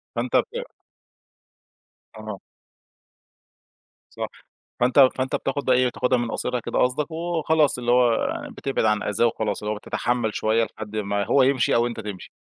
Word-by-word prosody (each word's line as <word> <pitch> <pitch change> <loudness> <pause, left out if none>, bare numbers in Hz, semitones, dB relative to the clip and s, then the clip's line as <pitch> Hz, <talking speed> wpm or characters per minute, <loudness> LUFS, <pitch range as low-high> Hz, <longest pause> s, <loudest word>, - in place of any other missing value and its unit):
فأنت 120 +1 -2
بت - - 0 1.5
آه. 110 -2 -7 1.8
صح، - - -2 0.5
فأنت 130 +2 +6
فأنت 130 0 -1
بتاخد 140 +1 -2
بقى 130 - +4
إيه 125 0 +3
بتاخدها 125 +1 +1
من 120 -1 -2
قاصرها 125 -1 -2
كده - - -3
قصدك، 135 +6 +1
وخلاص 160 -3 +1
اللي 120 0 0
هو 120 -2 +3 0.2
بتبعد 135 -4 -2
عن 105 -1 +2
أذاه 105 +3 +1
وخلاص، 110 -3 -1
اللي 105 +1 -2
هو - - -6
بتتحمل 120 +1 -2
شويّة 110 +1 +2
لحد 110 0 -7
ما 100 -1 -1
هو 130 +4 +4
يمشي، 130 -2 +2
أو 120 +1 +3
أنت 115 -1 -6
تمشي. 105 -4 -7
120 Hz, 155 wpm, -24 LUFS, 110-130 Hz, 1.8 s, فأنت